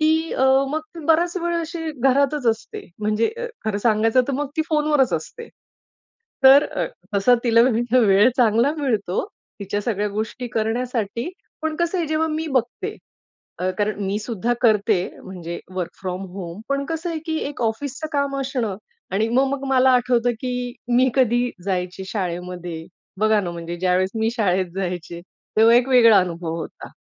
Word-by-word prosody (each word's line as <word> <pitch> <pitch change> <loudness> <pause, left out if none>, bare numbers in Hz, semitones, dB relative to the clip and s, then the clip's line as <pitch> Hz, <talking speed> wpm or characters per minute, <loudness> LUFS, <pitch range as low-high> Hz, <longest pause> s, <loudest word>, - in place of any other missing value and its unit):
की 320 +1 +2
अ, 265 - +1 0.3
मग 310 +2 -1 0.3
बराच 340 +2 +3
वेळ 345 -1 -1
अशी 325 0 -4
घरातच 275 0 +2
असते. 225 0 -2
म्हणजे 215 - +1
अ, 485 - -3 0.2
खरं 210 -2 -1
सांगायचं 225 +3 +3
तर - - 0
मग 285 +2 -2
ती 315 - +2
फोनवरच 300 -3 +2
असते. 470 -1 -5 1.0
तर 270 +2 +9
अ, - - -2 0.3
तसा 245 +5 +5
तिला 230 -1 +5 0.4
वेळ 205 0 +5
चांगला 235 +3 +3
मिळतो, 220 -10 -1 0.4
तिच्या 200 +1 -2
सगळ्या 210 -1 -1
गोष्टी 220 +4 -4
करण्यासाठी, 230 - -2 0.3
पण 315 0 -2
कसं 340 +3 0
आहे, 340 - 0
जेव्हा 315 +1 +1
मी 315 +1 -2
बघते, 255 -4 -2 0.6
अ, 185 +1 0
कारण 205 -1 0
मी 195 +2 -1
सुद्धा 225 +1 -2
करते 215 -3 +3 0.3
म्हणजे 170 -2 -6 0.2
वर्क 180 -2 -3
फ्रॉम 185 0 -4
होम. 180 0 -7
पण 275 0 0
कसं 325 +3 -3
आहे 325 - -3
की 320 -1 -1
एक 290 - -9
ऑफिसचं 260 +7 -2
काम 280 -1 0
असणं 250 -7 -2 0.4
आणि 215 +4 +1
मग 260 +4 +3
मग 280 -1 -3
मला 260 0 +5
आठवतं 245 -1 +2
की 255 -1 -3 0.4
मी 255 +1 +5
कधी 245 -1 +2
जायची 185 0 -2
शाळेमध्ये, 175 -3 -4 0.3
बघा 215 0 +3
ना 180 -3 -4
म्हणजे 170 0 -6
ज्यावेळेस 185 +1 +1
मी 220 0 +1
शाळेत 185 -5 +1
जायचे 175 -2 -4 0.4
तेव्हा 225 +2 +6
एक 250 +1 +3
वेगळा 230 -5 +7
अनुभव 170 -2 -3
होता. - - -9
230 Hz, 160 wpm, -22 LUFS, 195-275 Hz, 1.0 s, तर